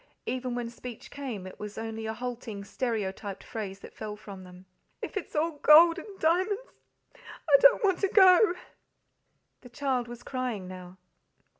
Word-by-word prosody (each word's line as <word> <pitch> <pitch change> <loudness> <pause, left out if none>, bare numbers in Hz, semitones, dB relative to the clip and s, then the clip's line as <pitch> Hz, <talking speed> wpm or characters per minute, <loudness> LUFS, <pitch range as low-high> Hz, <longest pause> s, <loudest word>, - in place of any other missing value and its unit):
Even 255 -1 -3
when 240 -1 -3
speech 240 -1 -10
came, 250 -9 -6
it 185 - -10
was 210 0 -7
only 225 0 -5
a 220 - -2
halting, 240 -4 -6
stereotyped 205 -4 -3
phrase 195 -3 -6
that - - -11
fell 210 -1 -6
from 200 -3 -10
them. 180 0 -14 0.3
"If - - -6
it's 405 - -5
all 310 0 0
gold 330 +4 +7
and 395 +3 -11
diamonds, 370 +6 +2 0.6
I - - +1
don't - - +6
want 385 -3 +2
to 395 - +2
go!" 375 -1 +6 1.1
The 250 - -13
child 255 -1 -1
was 240 0 -10
crying 245 -8 -3
now. 185 0 -10
245 Hz, 160 wpm, -28 LUFS, 210-320 Hz, 1.1 s, gold